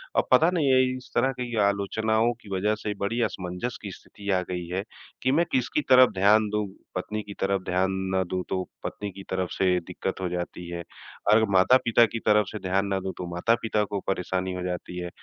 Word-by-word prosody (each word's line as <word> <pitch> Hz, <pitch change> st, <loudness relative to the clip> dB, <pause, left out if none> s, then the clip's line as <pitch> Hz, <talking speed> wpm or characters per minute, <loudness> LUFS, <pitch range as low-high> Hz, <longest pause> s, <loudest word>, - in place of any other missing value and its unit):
अ, -, -, +5 dB
पता 165 Hz, -, +6 dB
नहीं 165 Hz, -6 st, +1 dB
ये 130 Hz, 0 st, +5 dB
इस 130 Hz, -, -13 dB
तरह 135 Hz, -, +3 dB
की 120 Hz, -1 st, -3 dB
आलोचनाओं 110 Hz, +3 st, +1 dB
की 100 Hz, -, -14 dB
वज़ह 105 Hz, +3 st, +1 dB
से 105 Hz, -, -1 dB
बड़ी 115 Hz, +4 st, 0 dB
असमंजस 90 Hz, +6 st, -5 dB
की 100 Hz, -, -6 dB
स्थिति 100 Hz, +2 st, -10 dB
आ -, -, -1 dB
गई 90 Hz, -1 st, -3 dB
है 95 Hz, +2 st, -2 dB, 0.4 s
कि 130 Hz, -, +3 dB
मैं 165 Hz, +4 st, +3 dB
किसकी 130 Hz, +4 st, +1 dB
तरफ 130 Hz, -2 st, +7 dB
ध्यान 105 Hz, +3 st, +4 dB
दूँ। 105 Hz, -1 st, -1 dB, 0.3 s
पत्नी 110 Hz, 0 st, -3 dB
की 100 Hz, 0 st, -9 dB
तरफ 95 Hz, 0 st, +1 dB
ध्यान 90 Hz, +1 st, +1 dB, 0.2 s
ना 95 Hz, 0 st, +2 dB
दूँ, 90 Hz, 0 st, -3 dB
तो 95 Hz, -1 st, -1 dB, 0.2 s
पत्नी 105 Hz, -1 st, -5 dB
की 95 Hz, +1 st, -10 dB
तरफ 95 Hz, -1 st, -1 dB
से 90 Hz, -1 st, +2 dB
दिक्कत 95 Hz, +1 st, -4 dB
हो 90 Hz, -, -1 dB
जाती 90 Hz, 0 st, -5 dB
है, 85 Hz, 0 st, -5 dB, 0.5 s
अगर 110 Hz, +1 st, +6 dB
माता-पिता 115 Hz, +4 st, +5 dB
की 115 Hz, +1 st, -4 dB
तरफ 105 Hz, -1 st, +4 dB
से 110 Hz, -, -5 dB
ध्यान 95 Hz, +1 st, 0 dB
ना 95 Hz, -1 st, 0 dB
दूँ 95 Hz, 0 st, -4 dB
,तो 90 Hz, -, -4 dB
माता-पिता 110 Hz, +2 st, +1 dB
को 100 Hz, 0 st, -3 dB
परेशानी 95 Hz, 0 st, -1 dB
हो 90 Hz, -, -4 dB
जाती 90 Hz, 0 st, -4 dB
है। 90 Hz, -, -4 dB
100 Hz, 215 wpm, -26 LUFS, 95-110 Hz, 0.5 s, तरफ